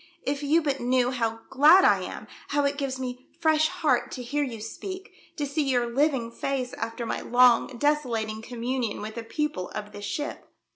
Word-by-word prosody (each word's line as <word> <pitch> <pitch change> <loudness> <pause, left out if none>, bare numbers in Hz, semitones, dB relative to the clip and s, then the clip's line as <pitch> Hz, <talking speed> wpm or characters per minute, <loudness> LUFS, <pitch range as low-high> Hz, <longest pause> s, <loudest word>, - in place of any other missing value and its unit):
"If 280 0 -2
you 305 +3 +3
but 280 -2 0
knew 250 0 +2
how 225 -3 -2
glad 305 +8 +7
I - - +5
am, - - -6 0.2
how 290 0 +1
it 280 +1 0
gives 270 -2 -2
me 255 0 -6
fresh 315 -1 +4
heart - - 0
to 250 - -5
hear 285 +5 -1
you 240 -5 -5
speak, 375 - -7 0.2
to 295 - -2
see 285 +3 -1
your 255 -4 +1
living 270 -4 +1
face 255 0 -3
after 230 +1 -4
my - - -2
long 245 -1 +5
desolating 235 -7 0
communion 240 -1 -3
with 215 +1 -5
the 230 - -6
people 225 -6 -2
of 210 0 -5
this 205 0 -7
ship 295 +6 -4
255 Hz, 190 wpm, -26 LUFS, 230-290 Hz, 0.2 s, glad